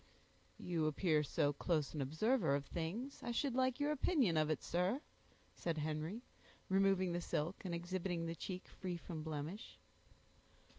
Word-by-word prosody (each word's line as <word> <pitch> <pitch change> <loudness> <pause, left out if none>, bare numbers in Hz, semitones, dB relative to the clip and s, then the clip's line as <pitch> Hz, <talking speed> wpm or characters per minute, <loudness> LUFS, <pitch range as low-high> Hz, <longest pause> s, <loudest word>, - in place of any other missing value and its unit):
"You 165 -3 0
appear 155 0 +3
so 145 0 +1
close 155 -2 0
an 150 - -2
observer 160 - +2
of 140 0 -2
things, 190 - -3
I - - -4
should 270 +2 +1
like 260 +1 +2
your 290 +1 +2
opinion 275 - +3
of 155 -1 +3
it, 155 - 0
sir," 180 +9 +1 0.5
said 165 -2 -2
Henry, 155 +8 -2 0.5
removing 190 -1 +4
the 175 0 -1
silk, 165 +2 -2
and 175 -3 -2
exhibiting 175 0 -2
the 165 - -2
cheek 185 +2 -5
free 180 -2 -4
from 165 -1 -6
blemish. 160 +7 -5
175 Hz, 155 wpm, -39 LUFS, 155-195 Hz, 0.5 s, removing